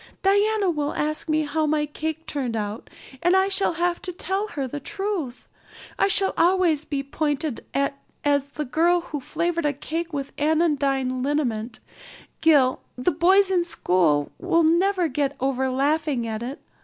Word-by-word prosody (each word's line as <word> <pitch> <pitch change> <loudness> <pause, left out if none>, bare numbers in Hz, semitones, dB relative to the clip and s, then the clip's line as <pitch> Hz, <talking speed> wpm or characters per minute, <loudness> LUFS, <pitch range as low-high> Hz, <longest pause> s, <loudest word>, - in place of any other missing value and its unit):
Diana 405 0 +3
will 295 -2 -2
ask 305 +2 -2
me 310 0 +2
how 305 +1 0
my 300 0 +1
cake 315 +2 -5
turned 260 -6 -3
out 210 0 -4 0.3
and 350 +2 +4
I 380 +1 +3
shall 390 -2 +1
have 345 +1 0
to 365 - -5
tell 385 +3 -2
her 285 -10 -4
the 290 +4 -5
truth. 385 -7 -4 0.5
I - - +4
shall 390 0 +1
always 340 -3 +3
be 280 -2 -2
pointed 295 -1 -2
at 280 0 0 0.3
as 285 -1 +2
the 300 +1 -4
girl 345 +6 +2
who 300 -3 -5
flavored 335 +3 -1
a 290 - 0
cake 330 +5 -4
with 280 -2 -4
anodyne 280 -5 +1
liniment. 250 -5 -2 0.6
Gil 285 -5 +4 0.2
the 250 +8 +1
boys 380 +5 +4
in 360 -2 +3
school 170 - +1
will 345 -2 +2
never 355 +3 +3
get 285 0 -1
over 265 0 0
laughing 280 -1 0
at 220 -1 -4
it. 255 +4 -5
305 Hz, 165 wpm, -24 LUFS, 275-345 Hz, 0.6 s, and